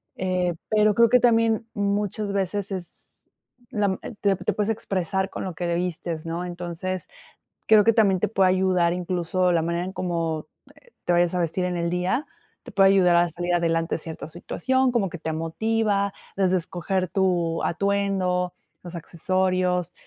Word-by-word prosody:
Eh, 180 -2 0
pero 215 -1 +3
creo 235 0 +6
que 250 - +6
también, 230 -1 +3
muchas 205 0 -1
veces 200 +1 -2
es 185 -3 -8 0.4
la 200 -3 0 0.3
te 200 -1 +3
te - - -1
puedes 210 0 -1
expresar 190 -2 -1
con - - -6
lo 185 -2 -4
que 170 +1 -3
vistes, 170 -2 -3
¿no? 170 +2 -3
Entonces, 175 +1 -5 0.6
creo 215 -1 +7
que 230 - +5
también, 200 -4 +3
te - - +1
puede 190 -2 +3
ayudar, 185 -2 +2
incluso, 180 0 0
la 165 - +3
manera 170 +2 -1
en 190 - -6
cómo, 165 -3 -2 0.4
eh, 485 - -24
te 175 - +2
vayas 175 0 +3
a - - +1
vestir 175 +2 -1
en 180 -1 -2
el 170 0 -1
día. 180 - 0 0.4
Te - - -10
puede 195 -1 +6
ayudar 180 -3 +5
a 175 0 +4
salir 175 +2 -2
adelante 165 -1 +1
cierta 160 0 -7
en - - -10
situación, 260 +10 0
como 210 -6 +1
que 175 - -7
te 160 0 -4
motiva, 200 +5 0 0.2
desde 190 -1 +2
escoger 180 +2 -2
tu 175 -3 0
atuendo, 190 -1 0 0.3
los 175 -1 -8
accesorios, 180 +1 0
185 Hz, 170 wpm, -24 LUFS, 175-200 Hz, 0.6 s, creo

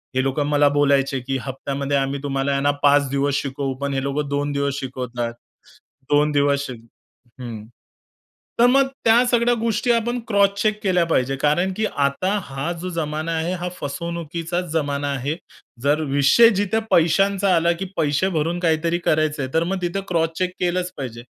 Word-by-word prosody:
हे 130 - +2
लोकं 135 +2 0
मला 145 0 +4
बोलायचे, 140 -2 +2
की 135 +2 -3
"हप्त्यामध्ये 140 +1 -3
आम्ही 135 +1 -1
तुम्हाला 135 0 -1
आहे 140 0 0
ना 145 - +3
5 145 -1 +4
दिवस 140 +1 0
शिकवू" 135 -1 -3
पण 140 -1 -1
हे 135 - -1
लोकं 140 +1 -2
2 145 0 -1
दिवस 140 -1 -1
शिकवतात. 125 -2 -4 0.8
2 150 +1 +3
दिवस 140 -1 +2
श - - -6 0.7
हं. 115 -4 -7 0.9
तर 235 - +7
मग 270 +1 +4 0.2
त्या 230 +2 +5
सगळ्या 240 0 +3
गोष्टी 230 +2 0
आपण 240 +1 0
क्रॉस 200 -2 +4
चेक 215 -1 0
केल्या 180 -3 +2
पाहिजे 135 -4 +1
कारण 150 +7 +1
की 220 - +1
आता 145 +9 +1
हा 135 +4 -4
जो 185 - -4
जमाना 155 +1 -2
आहे 165 +3 -1
हा 180 - -2
फसवणुकीचाच 170 +3 -4
जमाना 145 -2 -1
आहे. 140 +3 -2 0.5
जर 145 +2 +2
विषय 145 +12 +6
जिथं 205 +2 +1
पैशांचा 195 +4 +3
आला 170 +1 +3
की 195 - -3
पैसे 155 +4 +1
भरून 165 +3 -1
काहीतरी 165 0 +1
करायचं 155 -2 +1
आहे, 130 - -6
तर 160 - +2
मग 185 +2 -2
तिथं 175 +3 -2
क्रॉस 165 -2 +1
चेक 185 -1 0
केलंच 180 0 -1
पाहिजे. 120 -3 -6
150 Hz, 175 wpm, -22 LUFS, 140-180 Hz, 0.9 s, तर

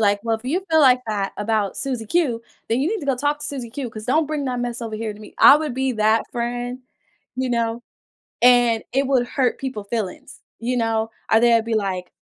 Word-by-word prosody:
like, 205 -1 +2
"Well, 225 -1 0
if 220 - -18
you 325 +9 -1
feel 320 - +4
like 255 -3 +6
that 205 -3 -2
about 210 -1 0
Susie 255 -5 -3
Q, 245 -3 0 0.3
then 230 +3 +1
you 290 - +1
need 435 +1 -2
to 285 - -7
go 270 -2 +1
talk 290 +3 0
to - - -4
Susie 255 -5 -6
Q, 265 0 -5
'cause 215 -1 -9
don't 300 +6 +2
bring 300 -1 -3
that 250 -2 -2
mess 240 0 -4
over 225 -1 -5
here 215 0 -3
to - - -14
me." 215 - -13
I - - +9
would 305 -3 -3
be 265 +1 -1
that 220 0 +1
friend, 245 0 -3 0.5
you 260 0 -2
know, 235 -1 -1 0.6
and 240 -2 +5
it 270 +1 +1
would 250 -3 +2
hurt 255 -1 0
people 260 -6 -4
feelings, 200 -2 -5 0.2
you 245 +2 -1
know, 225 -1 0 0.2
or 220 - +6
they’d 235 -1 +4
be 230 0 -2
like, 190 -4 -2
240 Hz, 230 wpm, -22 LUFS, 225-265 Hz, 0.6 s, I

